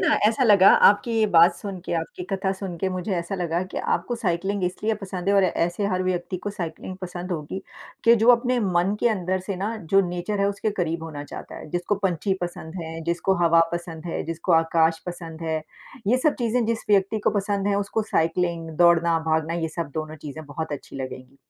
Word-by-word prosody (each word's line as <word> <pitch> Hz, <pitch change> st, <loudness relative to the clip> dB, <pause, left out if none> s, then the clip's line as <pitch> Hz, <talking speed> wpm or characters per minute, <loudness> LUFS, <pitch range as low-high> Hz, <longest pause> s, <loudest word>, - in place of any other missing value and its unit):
ना -, -, +3 dB
ऐसा 230 Hz, +5 st, +2 dB
लगा 200 Hz, -4 st, +7 dB, 0.2 s
आपकी 205 Hz, +4 st, +4 dB
ये 220 Hz, -, +4 dB
बात 165 Hz, +1 st, +7 dB
सुन 195 Hz, -3 st, -6 dB
के, -, -, -4 dB
आपकी 165 Hz, +2 st, -6 dB
कथा 190 Hz, 0 st, 0 dB
सुन 190 Hz, -2 st, -6 dB
के 190 Hz, -, 0 dB
मुझे 185 Hz, +2 st, -3 dB
ऐसा 170 Hz, +3 st, -3 dB
लगा 175 Hz, -1 st, -1 dB
कि -, -, -8 dB, 0.2 s
आपको 240 Hz, -, -1 dB
साइक्लिंग 195 Hz, -2 st, -1 dB
इसलिए 210 Hz, +5 st, -1 dB
पसंद 195 Hz, -2 st, -5 dB
है 200 Hz, -, +4 dB
और 195 Hz, -, +5 dB
ऐसे 175 Hz, +2 st, 0 dB
हर 185 Hz, -2 st, 0 dB
व्यक्ति 185 Hz, 0 st, -2 dB
को 205 Hz, +3 st, -5 dB
साइक्लिंग 185 Hz, -1 st, -6 dB
पसंद 180 Hz, 0 st, -6 dB
होगी, 165 Hz, +3 st, -4 dB, 0.4 s
कि 230 Hz, -, +7 dB
जो 235 Hz, -, +4 dB
अपने 245 Hz, +1 st, +3 dB
मन 185 Hz, 0 st, +1 dB
के 240 Hz, -, +4 dB
अंदर 185 Hz, -3 st, -1 dB
से 185 Hz, 0 st, -4 dB
ना 210 Hz, +5 st, -2 dB, 0.2 s
जो 195 Hz, -, +7 dB
नेचर 180 Hz, +4 st, -3 dB
है 200 Hz, -, +3 dB
उसके 200 Hz, +2 st, -1 dB
करीब 170 Hz, -5 st, -2 dB
होना 150 Hz, -3 st, -6 dB
चाहता -, -, -9 dB
है, -, -, -10 dB
जिसको 175 Hz, +4 st, 0 dB
पँछी 190 Hz, +1 st, +1 dB
पसंद 175 Hz, -1 st, -6 dB
है, 165 Hz, 0 st, -6 dB
जिसको 170 Hz, +3 st, +1 dB
हवा 165 Hz, 0 st, +5 dB
पसंद 170 Hz, -1 st, -5 dB
है, 165 Hz, -, -2 dB
जिसको 165 Hz, +2 st, -2 dB
आकाश 165 Hz, 0 st, +3 dB
पसंद 165 Hz, -2 st, -7 dB
है। 160 Hz, -1 st, -1 dB, 0.5 s
ये 250 Hz, +4 st, +3 dB
सब 305 Hz, -, +4 dB
चीज़ें 240 Hz, 0 st, +1 dB
जिस 230 Hz, -1 st, -1 dB
व्यक्ति 200 Hz, +2 st, +3 dB
को -, -, +4 dB
पसंद 200 Hz, 0 st, -1 dB
हैं 200 Hz, -, +2 dB
उसको 200 Hz, +2 st, -1 dB
साइक्लिंग 165 Hz, 0 st, 0 dB
दौड़ना, 170 Hz, -1 st, +5 dB
भागना 160 Hz, +1 st, 0 dB
ये 160 Hz, -, 0 dB
सब 160 Hz, -2 st, -5 dB
दोनों 155 Hz, 0 st, -4 dB
चीज़ें 155 Hz, +1 st, -8 dB
बहुत 150 Hz, +2 st, -5 dB
अच्छी 140 Hz, -, -7 dB
लगेंगी, 130 Hz, 0 st, -7 dB
180 Hz, 210 wpm, -24 LUFS, 165-200 Hz, 0.5 s, लगा